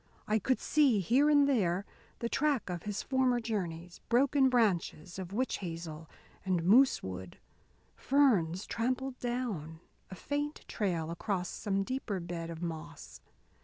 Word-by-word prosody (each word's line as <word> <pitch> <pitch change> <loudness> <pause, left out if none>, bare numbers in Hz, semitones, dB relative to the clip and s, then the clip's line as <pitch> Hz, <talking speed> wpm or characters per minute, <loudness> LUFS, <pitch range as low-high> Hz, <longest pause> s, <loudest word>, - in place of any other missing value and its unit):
I 215 +1 +2
could 260 +5 +1
see, 280 -8 +3
here 255 - +3
and 290 -1 +5
there, 195 -8 +1 0.3
the 235 - -2
track 275 -6 0
of 175 -2 -4
his 205 - -3
former 260 -2 +2
journeys: 180 -7 -4
broken 265 +2 +4
branches 190 -7 0
of 185 -1 -6
witch 255 +6 -1
hazel 165 -3 -6 0.3
and 185 -3 0
moose 245 +10 +5
wood, 95 -1 -7 0.6
ferns 210 - +2
trampled 255 +2 -2
down, 220 -11 -3 0.3
a 190 - -8
faint 290 - -3
trail 170 -6 -1
across 180 +1 -2
some 195 -2 -1
deeper 235 -4 -3
bed 170 -1 -5
of 165 0 -6
moss. 155 - -7
200 Hz, 140 wpm, -32 LUFS, 170-255 Hz, 0.6 s, and